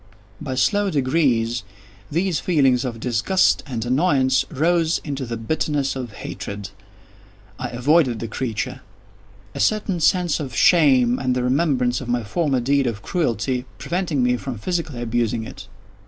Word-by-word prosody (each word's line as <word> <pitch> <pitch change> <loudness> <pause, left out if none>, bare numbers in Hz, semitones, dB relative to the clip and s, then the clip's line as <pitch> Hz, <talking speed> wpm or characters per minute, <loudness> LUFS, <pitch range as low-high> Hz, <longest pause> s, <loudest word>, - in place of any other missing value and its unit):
By 135 -4 -4
slow 200 +10 +2
degrees, 130 -6 +1 0.5
these 175 +1 0
feelings 135 -8 +2
of 115 -2 -4
disgust 125 +11 +2
and 120 -4 -3
annoyance 130 -1 +2
rose 165 +2 +1
into 140 -3 -4
the 115 0 -4
bitterness 140 +3 -1
of 125 -5 -6
hatred. 100 0 -7 0.9
I - - -2
avoided 130 0 +2
the 115 - -5
creature; 120 +2 -4 0.7
a - - -6
certain 210 -4 +1
sense 175 0 +2
of 135 -5 -5
shame, 130 -8 +4
and 130 -1 0
the 125 - 0
remembrance 125 -2 +1
of 130 - -7
my 120 -1 0
former 135 +4 0
deed 140 +1 +2
of 110 -2 -4
cruelty, 125 - -1
preventing 170 -7 -1
me 125 0 +2
from 130 -2 -6
physically 155 - -3
abusing 115 -1 -1
it. 95 -3 -10
130 Hz, 145 wpm, -22 LUFS, 120-160 Hz, 0.9 s, shame